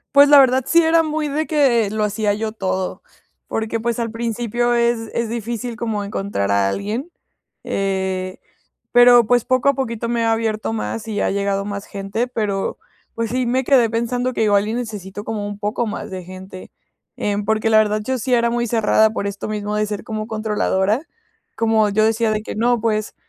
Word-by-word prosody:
Pues, 285 0 +8
la 290 - +9
verdad, 260 -1 +5
sí 335 0 +5
era 325 +1 +4
muy 310 -1 -2
de 300 +2 -2
que, 255 -8 +3
lo 215 +1 -1
hacía 210 0 0
yo 220 +1 -3
todo, 190 -3 -3 0.5
porque, 225 +1 -2
pues, 235 0 -1
al 230 -2 -2
principio 235 +1 -1
es 235 -1 +1
es 235 0 0
difícil 235 +1 -4
como 220 -3 -2
encontrar 195 - -2
a 100 -1 +2
alguien, 215 - -3 0.5
eh, 190 -1 -2 0.5
pero, 245 -1 +7
pues, 245 +1 +3
poco 255 +2 +2
a - - +3
poquito 235 -4 -3
me 235 -1 0
he - - +1
abierto 225 -1 0
más, 225 0 -4
y 210 -2 -3
ha - - +1
llegado 200 0 -1
más 200 0 -5
gente, 200 +4 -3
pero, 210 -5 -2 0.4
pues 230 -1 -2
sí, 250 0 0
me 255 +2 +1
quedé 245 -3 +4
pensando 245 +3 -1
que 225 - 0
igual, 205 -1 +3
y 220 - -2
necesito 205 -4 -6
como 210 -2 -4
un 205 0 -6
poco 210 +3 -2
más 210 - -5
de 185 -1 -6
gente. 185 +1 -10 0.5
Em, 205 0 -1
porque, 220 +1 +1
la 220 - +6
verdad, 215 0 +1
yo 260 +1 -1
sí 250 +2 +1
era 235 0 +2
muy 240 0 0
cerrada, 220 -1 +3
por 215 -2 -4
esto 200 0 -4
mismo 210 -1 -3
de 210 0 0
ser 205 -1 -5
como 215 -1 -4
controladora, 215 - 0 0.5
como 220 -2 +2
yo 215 +2 +2
decía 225 0 +1
de 215 0 -2
que: - - -6
"No, 240 +2 +2
pues, 215 -1 -1
220 Hz, 200 wpm, -20 LUFS, 205-240 Hz, 0.5 s, la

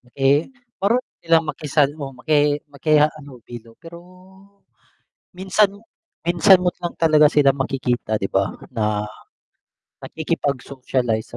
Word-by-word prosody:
Eh, 140 - +2 0.3
marunong 235 +6 +1
silang 165 -1 +3
makisal 145 -1 0
oo 140 -3 -6
maki 145 +2 +1
maki-halubilo 140 -6 -2
pero 170 0 -11 1.4
minsan 195 +2 +2 0.6
minsan 180 +3 +5
mo 180 - +3
lang 175 - -4
talaga 155 -2 +5
sila 140 -3 +3
makikita 125 -5 -2
'di 95 - -4
ba 95 0 +1 0.2
na, 105 -1 -1 1.0
nakikipag-socialize 130 -7 -3
145 Hz, 100 wpm, -21 LUFS, 125-165 Hz, 1.4 s, minsan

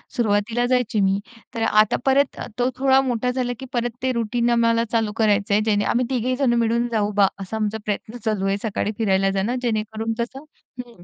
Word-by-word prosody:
सुरुवातीला 225 +1 +1
जायची 245 -4 +1
मी. 195 0 +2 0.4
तर 230 - -3
आता 215 -1 +4
परत 275 +1 +2 0.2
तो 245 - +2
थोडा 265 0 +4
मोठा 250 -1 -1
झाला 250 -1 -2
की 265 - -7
परत 240 -1 -1
ते 260 - +1
रुटीन 235 +1 0
आम्हाला 230 -1 +3
चालू 225 -2 +1
करायचं 205 -2 +2
आहे, 210 - +4
जेणे 205 -2 +1
आम्ही 245 +1 +1
3घेही 255 0 0
जण 255 -3 +2
मिळून 235 +1 +1
जाऊ 210 -2 0
बा, 200 -1 +4
असा 195 +3 -6
आमचा 215 0 -1
प्रयत्न 215 +3 -4
चालू 210 -3 0
आहे, 195 +1 +1
सकाळी 210 -1 -1
फिरायला 195 -3 +2
जाणं, 200 +6 -1
जेणेकरून 220 -1 -2
कसं 260 +4 -4 0.4
हं, 235 -8 -10
225 Hz, 195 wpm, -22 LUFS, 210-245 Hz, 0.4 s, आता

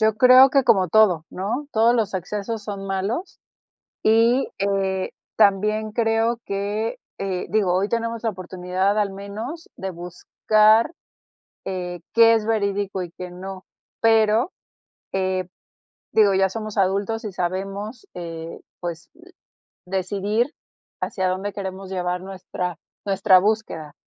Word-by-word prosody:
Yo 220 -1 +3
creo 255 +3 +8
que 275 0 +4
como 190 -7 +4
todo, 180 -5 +4
¿no? 220 +10 -3
Todos 225 +2 +4
los 220 -5 0
excesos 210 +4 -3
son 200 -2 -5
malos, 200 - -3 0.6
y 230 +4 +4
eh, 195 -1 0 0.3
también 215 +1 +2
creo 225 +1 +1
que, 205 +3 -2 0.2
eh, 190 -2 -3
digo, 195 -3 +2
hoy 195 +2 +1
tenemos 230 0 -2
la 225 - +2
oportunidad 185 +2 -1
al 200 -2 +1
menos 215 - -7
de 190 0 -4
buscar, 215 - +2 0.7
eh, 180 -2 -4
qué 230 0 +7
es 220 -1 -1
verídico 200 -3 -1
y 175 - -8
qué 180 -1 -7
no. 185 +1 -8 0.4
Pero, 225 - +4 0.6
eh, 185 -1 -1 0.7
digo, 205 -3 +5
ya 190 0 +3
somos 215 +1 -6
adultos 200 +4 0
y 210 - -4
sabemos, 195 +6 -4
eh, 165 -1 -7 0.2
pues, 170 -1 -6 0.8
decidir 200 - -1 0.5
hacia 190 -2 -1
dónde 190 +2 -2
queremos 190 -1 -6
llevar 180 -1 -2
nuestra 185 -2 -5 0.3
nuestra 195 -1 +5
búsqueda. 205 -8 -2
200 Hz, 125 wpm, -23 LUFS, 185-220 Hz, 0.8 s, creo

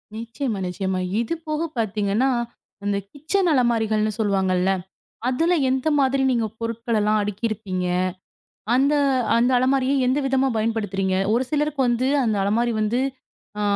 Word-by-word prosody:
நிச்சியமா, 230 0 -4
நிச்சியமா. 190 +1 -2 0.2
இது 235 - -2
போகப் 310 0 -3
பாத்தீங்கன்னா 215 +3 +1 0.5
அந்தக் 200 -1 -2
கிச்சன் 345 +6 0
அலமாரிகள்னு 220 -4 +1
சொல்லுவாங்கல்ல. 190 -3 +1 0.6
அதுல 325 +8 +2 0.2
எந்த 260 +2 0
மாதிரி 270 0 +2
நீங்கப் 225 -3 -1
பொருட்களலாம் 230 -2 0
அடுக்கிருப்பீங்க. 205 -2 -3 0.9
அந்த 275 +3 +3 0.4
அந்த 240 +2 +3
அலமாரியை 265 +1 +2
எந்த 260 +3 +2
விதமா 270 0 +2
பயன்படுத்துறீங்க. 205 -4 -1 0.2
ஒரு 245 +3 +1
சிலருக்கு 300 -1 0
வந்து 240 +2 +1 0.2
அந்த 220 -3 +1
அலமாரி 230 +4 +1
வந்து 215 +4 +1 0.6
அ - - 0
230 Hz, 120 wpm, -23 LUFS, 210-260 Hz, 0.9 s, அந்த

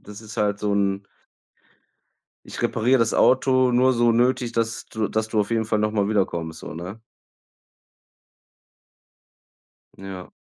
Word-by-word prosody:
Das 105 +1 -11
ist 110 0 -11
halt 105 -1 0
so 105 -1 0
'n 100 0 0 1.4
Ich - - -7
repariere 125 +4 +2
das 115 -1 +1
Auto 130 -1 +3
nur 130 +2 +4
so 120 -1 +3
nötig, 120 0 +1
dass 115 -1 -2
du 110 -1 -3
dass 110 0 -1
du 110 -1 +1
auf 105 - -2
jeden 115 -1 +1
Fall 110 -1 0
noch 105 0 +1
mal 100 -2 0
wiederkommst, 85 -6 -1
so, - - -8
ne? 90 +7 -8 3.0
Ja. 95 -2 -9
110 Hz, 145 wpm, -23 LUFS, 100-115 Hz, 3.0 s, nur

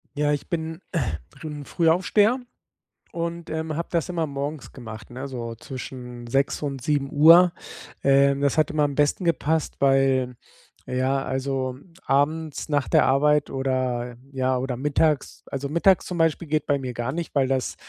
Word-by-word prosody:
Ja, 145 0 +1
ich 145 - -4
bin, 160 -1 -3
äh, 165 -7 0 0.4
bin 150 -2 -6
'n - - -10
Frühaufsteher 190 +8 +3 0.7
und, 170 0 -4
ähm, 160 -1 -3
habe 170 - -3
das 170 +1 0
immer 165 -2 -1
morgens 140 +1 -5
gemacht, 115 -3 -10
ne, 130 +3 -6
so 115 -3 -5
zwischen 125 -1 -8
6.00 135 +5 0
und 140 -3 -3
07:00. 150 +5 +5 0.5
Ähm, 140 0 +4
das 140 +1 +1
hat 155 -1 +3
immer 150 -1 +1
am 145 -1 0
besten 150 +5 +1
gepasst, 160 -1 0
weil, 135 -2 +3 0.5
ja, 130 +2 0
also, 130 -1 -2 0.3
abends 150 +3 0
nach 145 -2 +1
der - - +4
Arbeit 150 +2 +3
oder 130 -2 -1 0.2
ja, 130 -1 0
oder 125 -1 -3
mittags, 150 +1 0
also, 140 +1 -4
mittags 170 +4 +3
zum 180 - -5
Beispiel 165 0 +1
geht 155 0 0
bei 145 - +2
mir 125 -2 -5
gar 120 +2 -3
nicht, 170 +3 -5
weil 135 -2 +3
das 130 -1 -1
140 Hz, 165 wpm, -24 LUFS, 130-160 Hz, 0.7 s, 07:00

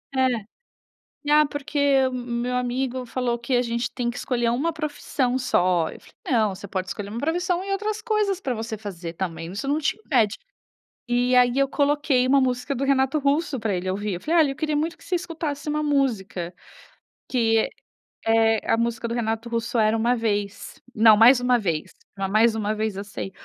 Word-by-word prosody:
é, 260 0 +4 1.1
ah 300 0 +6
porque 285 -2 +1
o 260 - -4
meu 245 0 -3
amigo 250 +1 -2
falou 240 -1 -1
que 250 +2 -1
a 245 - +4
gente 235 0 -2
tem 240 -2 -1
que 245 - -5
escolher 240 -2 0
uma 270 +8 0
profissão 290 -4 -2
só, 180 -9 +2
eu - - -10
falei - - -20 0.2
não, 220 -6 +2
você 200 +1 -9
pode 185 0 -3
escolher 200 +2 -5
uma 225 - -5
profissão 350 +5 0
e 395 - -5
outras 425 +2 -2
coisas 420 -4 0
pra 265 -10 -2
você 225 0 -5
fazer 180 -5 -7
também, 165 -1 -5
isso 220 +8 -5
não 290 +2 +1
te 300 - -1
impede, 245 - +1 0.7
e 245 +1 +2
aí 250 0 +4
eu 275 0 +3
coloquei 285 -2 +2
uma 275 +1 +5
música 250 +1 -1
do 265 - -2
Renato 275 +1 +2
Russo 285 -1 0
pra 215 -3 -1
ele 180 +1 -3
ouvir, 205 +2 -2
eu 175 - -5
falei, 330 +2 +2
olha 285 -3 +2
eu - - -6
queria 305 +1 -1
muito 325 +3 -1
que - - -19
você 365 - -1
escutasse 320 -4 -4
uma 300 0 0
música, 220 - -1 0.8
que 225 -3 +2 0.6
É 225 0 +3
a - - +5
música 235 0 -1
do 230 - -3
Renato 225 0 -2
Russo 235 +1 -2
era 215 0 +3
Uma 235 +2 +2
Vez, 205 -3 -3
não 220 -2 +7
Mais 240 +4 +7
Uma 250 0 +3
Vez, 165 -7 -2 0.4
Mais 220 +2 +4
Uma 215 -1 -1
Vez, 215 -2 -2
eu 200 - -4
sei, 200 -1 -6
245 Hz, 195 wpm, -24 LUFS, 220-280 Hz, 1.1 s, não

